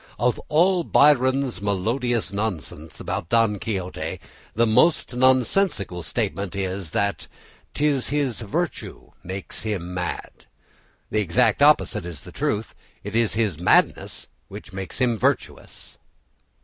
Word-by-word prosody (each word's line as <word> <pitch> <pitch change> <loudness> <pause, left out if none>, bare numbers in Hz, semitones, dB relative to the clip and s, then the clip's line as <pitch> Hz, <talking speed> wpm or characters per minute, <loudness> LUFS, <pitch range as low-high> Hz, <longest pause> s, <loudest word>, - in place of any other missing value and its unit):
Of 120 +2 +1
all 175 +3 +3
Byron's 135 - +3
melodious 115 +4 -1
nonsense 85 -7 -4
about 85 - -4
Don 115 -3 +2
Quixote, 95 -4 -4 0.4
the 115 +2 +3
most 125 +4 +3
nonsensical 130 - +2
statement 100 +1 -3
is 95 -2 -3
that 100 +5 -1 0.5
"'t 150 - +1
is 140 -4 +1
his 140 -4 -1
virtue 105 -4 -4
makes 95 +2 -6
him 95 -5 -4
mad!" 90 -1 -5 0.6
The 110 - +1
exact 110 +6 +2
opposite 120 - +4
is 80 -6 -7
the - - -12
truth; - - -2 0.3
it 105 +2 -6
is 115 -2 +2
his 105 -8 0
madness 90 - +2 0.4
makes 95 0 -7
him 120 -3 +1
virtuous. - - -3
110 Hz, 125 wpm, -23 LUFS, 95-130 Hz, 0.6 s, opposite